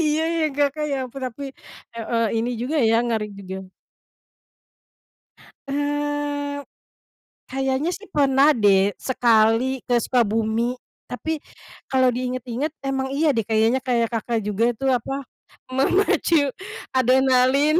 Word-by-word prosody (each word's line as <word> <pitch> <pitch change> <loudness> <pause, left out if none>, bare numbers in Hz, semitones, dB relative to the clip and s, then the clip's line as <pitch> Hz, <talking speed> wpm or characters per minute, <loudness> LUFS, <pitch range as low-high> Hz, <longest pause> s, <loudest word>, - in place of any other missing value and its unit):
Iya 305 +1 +1 0.2
ya, 320 - +2
Kakak 290 +1 +1
ya, 275 - 0
perapi 260 -1 -6 0.5
heeh, 230 0 -1 0.2
ini 235 +2 -1
juga 265 +6 -2
ya, 225 - +4
ngeri 220 -2 -1
juga. 190 -1 -8 2.0
Eee, 290 0 -2 0.9
kayaknya 270 +4 0
sih 405 +4 -8
pernah 280 -1 +4
deh 200 -2 +3
sekali 240 +1 +2
ke 245 - +2
Sukabumi. 225 0 +1 0.4
Tapi 315 +5 -3 0.5
kalau 260 -1 +4
diinget-inget, 255 +3 -3
emang 270 -1 -1
iya 305 +1 +3
deh 225 - +1
kayaknya, 225 +3 +2
kayak 240 -2 +1
Kakak 230 0 -1
juga 210 +4 +1
itu 270 - -5
apa, 270 +3 -2 0.5
memacu 290 0 +2 0.4
adrenalin. 260 +4 +4
260 Hz, 110 wpm, -23 LUFS, 230-285 Hz, 2.0 s, ya